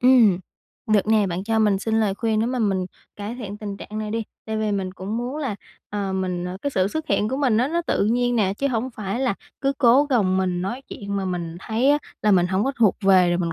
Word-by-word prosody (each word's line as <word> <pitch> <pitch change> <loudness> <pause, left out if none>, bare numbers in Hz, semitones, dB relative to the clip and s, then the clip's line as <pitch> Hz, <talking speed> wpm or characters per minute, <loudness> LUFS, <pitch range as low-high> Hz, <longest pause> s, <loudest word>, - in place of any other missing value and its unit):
Ừm, 245 -7 +6 0.5
được 210 -2 +3
nè. 215 -2 +3
Bạn 180 +1 -3
cho 225 +1 +1
mình 210 -3 +3
xin 225 +2 0
lời 205 -3 +1
khuyên 220 0 0
để 225 - +1
mà 255 +1 -1
mình 195 -5 +1 0.3
cải 210 +3 -5
thiện 210 -5 -7
tình 205 -2 -5
trạng 215 +2 -7
này 215 -1 -3
đi. 225 +1 -1 0.2
Tại 220 0 -2
vì 215 -1 0
mình 190 -2 -2
cũng 195 +4 -5
muốn 245 +5 -3
là, 265 -10 -3 0.3
ờ, 200 -2 -2
mình, 185 -2 -2
ờ 180 +1 -4
cái 285 - -1
sự 190 -7 +1
xuất 315 +7 -4
hiện 210 - +2
của 265 - -2
mình 255 -6 +2
á, 250 +4 +2
nó 340 +2 0
tự 325 - 0
nhiên 245 +2 +1
nè, 200 -3 +2
chứ 280 - +1
hổng 245 +1 -1
phải 210 0 -4
là 260 -6 +1 0.3
cứ 275 0 +1
cố 260 +3 +6
gồng 210 -10 +2
mình 180 -1 0
nói 240 +8 -4
chuyện 200 -1 -5
mà 195 - -1
mình 175 -2 -3
thấy 230 +7 +1
á, 295 - +4 0.2
là 210 - +3
mình 180 -3 +4
hổng 190 +3 0
có 270 - 0
thuộc 220 -5 +4
về 190 -3 +5
rồi 175 0 +1
mình 170 -2 -1
215 Hz, 265 wpm, -23 LUFS, 190-240 Hz, 0.5 s, Ừm